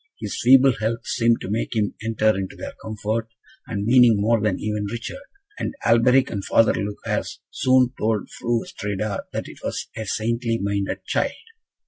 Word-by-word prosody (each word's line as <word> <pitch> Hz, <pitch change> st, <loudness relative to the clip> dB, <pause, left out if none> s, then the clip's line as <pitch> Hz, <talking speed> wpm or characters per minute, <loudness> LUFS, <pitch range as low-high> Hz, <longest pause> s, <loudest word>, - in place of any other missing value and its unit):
His -, -, -4 dB
feeble 130 Hz, +1 st, +6 dB
health 115 Hz, +2 st, -2 dB
seemed 115 Hz, -1 st, +2 dB
to 95 Hz, -, -5 dB
make 115 Hz, +2 st, -2 dB
him 105 Hz, -2 st, 0 dB
enter 110 Hz, -1 st, +2 dB
into 95 Hz, -1 st, -4 dB
their -, -, -7 dB
comfort 110 Hz, +1 st, -3 dB, 0.4 s
and 100 Hz, -2 st, -3 dB
meaning 120 Hz, -1 st, +6 dB
more 110 Hz, +2 st, +2 dB
than 105 Hz, -3 st, 0 dB
even 105 Hz, -1 st, -2 dB
Richard; 115 Hz, -, -6 dB, 0.4 s
and -, -, -3 dB
Alberic 125 Hz, +3 st, +4 dB
and 100 Hz, -3 st, -3 dB
Father 115 Hz, -, +4 dB
Lucas 100 Hz, +1 st, -3 dB
soon 130 Hz, -1 st, +3 dB
told 110 Hz, -1 st, 0 dB
Fru 120 Hz, -1 st, -1 dB
Astrida 105 Hz, 0 st, -4 dB
that -, -, -4 dB
it -, -, -12 dB
was -, -, -4 dB
a 110 Hz, -1 st, -5 dB
saintly 115 Hz, +2 st, -1 dB
minded 100 Hz, -1 st, -2 dB
child. -, -, 0 dB
115 Hz, 165 wpm, -23 LUFS, 105-120 Hz, 0.4 s, feeble